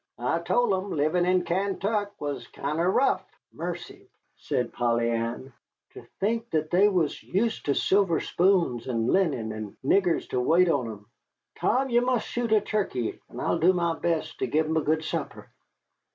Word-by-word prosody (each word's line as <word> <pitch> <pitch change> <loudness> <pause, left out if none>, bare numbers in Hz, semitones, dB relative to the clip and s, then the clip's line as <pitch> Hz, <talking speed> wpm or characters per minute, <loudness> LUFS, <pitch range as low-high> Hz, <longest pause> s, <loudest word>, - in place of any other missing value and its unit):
I 125 +7 0
told 235 +5 +1
'em 190 +1 -2
livin' 165 +3 +1
in 180 0 +3
Kaintuck 200 +3 -1
was 145 -1 -4
kinder 155 +5 -1
rough." 255 +8 +2 0.3
"Mercy!" - - -7 0.3
said 125 - -2
Polly 120 -1 +1
Ann, 115 +3 -3 0.4
"ter - - -12
think 225 +3 -1
that 155 -1 -1
they 190 +4 +5
was 175 -7 0
use' 220 +4 -1
ter 140 - 0
silver 190 -4 +2
spoons, 175 -11 +1
and 115 -3 -1
linen, 140 - +1
and 110 -1 -7
niggers 180 +2 +2
ter 125 - -1
wait 170 +8 +4
on 135 -7 +1
'em. 105 -1 -9 0.5
Tom, 265 +1 +1
ye 240 - +5
must 245 -2 0
shoot 240 -2 -2
a 215 -1 +5
turkey, 160 - -2
and - - -9
I'll - - 0
do 180 +3 +5
my 170 -2 0
best 165 -1 -2
to - - 0
give 155 +1 +1
'em 160 +1 0
a - - +3
good 155 +1 0
supper." - - -5
170 Hz, 175 wpm, -26 LUFS, 140-200 Hz, 0.5 s, they